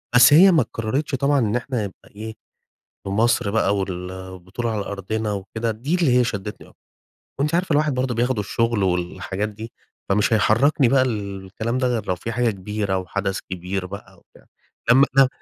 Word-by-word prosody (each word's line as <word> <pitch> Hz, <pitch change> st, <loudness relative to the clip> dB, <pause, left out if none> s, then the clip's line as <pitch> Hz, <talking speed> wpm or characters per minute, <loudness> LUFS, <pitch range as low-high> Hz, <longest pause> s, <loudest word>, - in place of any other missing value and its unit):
بس 125 Hz, +3 st, +8 dB
هي 185 Hz, +5 st, +8 dB
ما 165 Hz, -, +4 dB
اتكررتش 135 Hz, +7 st, -2 dB
طبعًا 140 Hz, +1 st, +2 dB
إن 110 Hz, -2 st, 0 dB
إحنا 120 Hz, -3 st, -2 dB
نبقى 95 Hz, -, -12 dB
إيه، 110 Hz, +1 st, -6 dB, 0.7 s
في -, -, -3 dB
مصر 110 Hz, +1 st, +2 dB
بقى 100 Hz, -2 st, +2 dB
وال 90 Hz, -2 st, -4 dB
والبطولة 95 Hz, +5 st, -5 dB
على 105 Hz, -2 st, -2 dB
أرضنا 105 Hz, +2 st, -3 dB
وكده، 110 Hz, +4 st, -3 dB
دي 125 Hz, +10 st, -2 dB
اللي 145 Hz, -9 st, +3 dB
هي 125 Hz, -, +4 dB
شدتني 105 Hz, -2 st, -5 dB
أكتر. -, -, -23 dB, 0.6 s
وأنتِ 150 Hz, +4 st, +1 dB
عارفة 175 Hz, -3 st, +1 dB
الواحد 150 Hz, -1 st, +2 dB
برضو 125 Hz, 0 st, -1 dB
بياخده 120 Hz, 0 st, 0 dB
الشغل 115 Hz, +1 st, 0 dB
والحاجات 95 Hz, +3 st, -2 dB
دي، 110 Hz, +2 st, -9 dB, 0.4 s
فمش 105 Hz, +3 st, +2 dB
هيحركني 125 Hz, +5 st, +3 dB
بقى 135 Hz, +2 st, +4 dB
الكلام 105 Hz, -1 st, -3 dB
ده 130 Hz, -1 st, +1 dB
غير 115 Hz, -4 st, -1 dB
لو 90 Hz, -, +1 dB
في 115 Hz, +6 st, -5 dB
حاجة 120 Hz, -1 st, +1 dB
كبيرة 100 Hz, 0 st, -2 dB
وحدث 95 Hz, +2 st, -2 dB
كبير 90 Hz, +1 st, -3 dB
بقى 95 Hz, -1 st, -10 dB
وبتاع، -, -, -23 dB, 0.5 s
لما 135 Hz, +3 st, +7 dB
لم 135 Hz, -, +8 dB
110 Hz, 180 wpm, -22 LUFS, 100-125 Hz, 0.7 s, بس